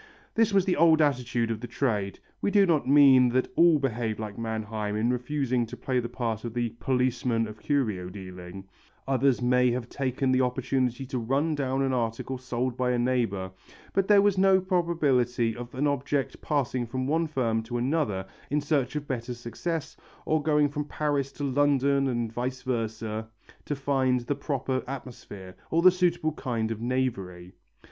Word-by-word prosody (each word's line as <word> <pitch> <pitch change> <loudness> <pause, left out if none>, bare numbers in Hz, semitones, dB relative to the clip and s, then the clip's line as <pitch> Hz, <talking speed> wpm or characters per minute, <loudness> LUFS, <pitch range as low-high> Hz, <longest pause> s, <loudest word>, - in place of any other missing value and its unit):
This 225 -1 +3
was 195 -2 +3
the 185 - +1
old 160 0 +5
attitude 125 -5 +1
of 110 - -3
the 120 - -6
trade. 105 -9 -1 0.2
We - - +1
do 200 -1 +5
not 160 -7 +1
mean 135 -3 +7
that 130 +1 0
all 170 -2 +6
behaved 120 -5 -2
like 105 -2 -5
Manheim 110 -2 -3
in 115 +3 +1
refusing 125 0 0
to - - -9
play 130 -2 -1
the 120 -1 -4
part 115 -3 -3
of 120 0 -6 0.2
"policeman 125 -3 0
of 110 0 -10
curio 110 -12 -1
dealing," 90 -1 -9 0.4
others 135 -1 +2
may 125 0 +4
have 120 0 -3
taken 130 -1 -1
the 130 0 +3
opportunity 130 0 0
to 130 -1 -3
run 135 +7 0
down 135 -2 -1
an 135 -1 0
article 120 +2 -2
sold 125 -1 -2
by 125 0 0
a - - +1
neighbour, 115 -7 0 0.4
but 195 -1 +1
there 205 -1 +6
was 200 -2 +2
no 190 0 +5
probability 145 - +1
of 120 +2 -8
an 140 +3 0
object 140 -1 -1
passing 130 -5 -1
from 130 +3 -3
one 160 +4 +1
firm 115 -7 0
to 120 +2 -4
another 120 -7 0 0.2
in 150 - +1
search 145 -3 0
of 145 -1 -3
better 125 -1 -3
success, 145 +7 -4 0.3
or 155 0 +1
going 150 -1 +3
from 145 +1 -4
Paris 145 -2 -1
to 145 - -6
London 140 0 +2
and 120 -3 -2
vice 125 +2 -3
versa 110 -2 -3 0.4
to 145 - -2
find 135 -2 +1
the 120 +4 -2
proper 135 -2 -2
atmosphere 115 -8 -8
or 165 +1 +1
the 185 - +9
suitable 175 -3 +1
kind 115 -6 -2
of 110 -1 -4
knavery. 100 -8 -2
130 Hz, 175 wpm, -27 LUFS, 115-145 Hz, 0.4 s, the